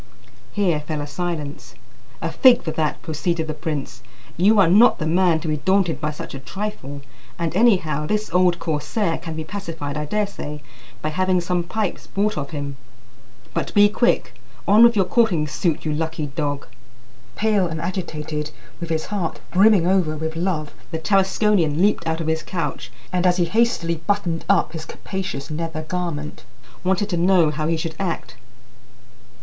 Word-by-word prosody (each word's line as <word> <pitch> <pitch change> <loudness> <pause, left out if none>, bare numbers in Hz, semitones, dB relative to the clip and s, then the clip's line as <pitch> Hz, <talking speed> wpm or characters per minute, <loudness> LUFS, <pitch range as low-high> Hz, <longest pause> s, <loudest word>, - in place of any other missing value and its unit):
Here 180 -7 +1
fell 150 0 -4
a - - -3
silence. 150 -2 -5 0.5
"A - - -1
fig 255 -1 +6
for 160 - -2
that!" 155 -1 -1
proceeded 160 +1 -1
the 155 - -3
prince; 150 -6 -4 0.3
"you 205 +5 +4
are 190 - +6
not 210 +8 +6
the 155 - -3
man 170 0 +3
to 170 - -5
be 155 -1 0
daunted 185 -1 +1
by 150 - 0
such 165 +2 -7
a 135 - -6
trifle; 145 -2 -5 0.4
and, 170 -1 -2
anyhow, 170 -9 +3
this 215 +2 0
old 180 -1 +4
corsair 165 +3 -1
can 165 -1 -6
be 160 - -3
pacified, 160 -5 -5
I 150 - -2
daresay, 175 -6 -3 0.4
by 155 - 0
having 185 +3 +1
some 175 0 0
pipes 200 +3 -3
bought 210 +2 0
of 140 -2 -4
him. 145 -2 -5 0.8
But 165 -4 -3
be 205 0 +7
quick! 205 - +1 0.3
On 210 +4 +7
with 235 -1 +7
your 195 -3 +3
courting 180 -8 +2
suit, 155 +2 -1
you 155 - 0
lucky 160 0 -2
dog!" 145 0 -3 0.7
Pale 210 -4 +2
and 160 -1 -4
agitated, 155 -4 -3 0.3
with 170 -1 -5
his 160 -1 -1
heart 195 -6 -3
brimming 195 -1 +5
over 180 -4 +2
with 160 +1 -3
love, 165 -3 -2 0.2
the 165 - -3
Tarasconian 190 -2 +2
leaped 195 -3 +2
out 160 0 0
of 165 - -3
his 160 0 0
couch, 165 -5 -4 0.2
and, 180 0 +2
as 180 0 +3
he 175 - +3
hastily 170 -4 +1
buttoned 190 -5 0
up 200 -4 +3
his 160 -1 -6
capacious 170 -8 -5
nether 160 0 -3
garment, 160 -3 -4 0.4
wanted 190 +2 +1
to 175 - 0
know 175 -2 +4
how 155 0 -2
he 165 0 +1
should 160 0 -3
act. 180 -8 -3
170 Hz, 175 wpm, -22 LUFS, 155-190 Hz, 0.8 s, be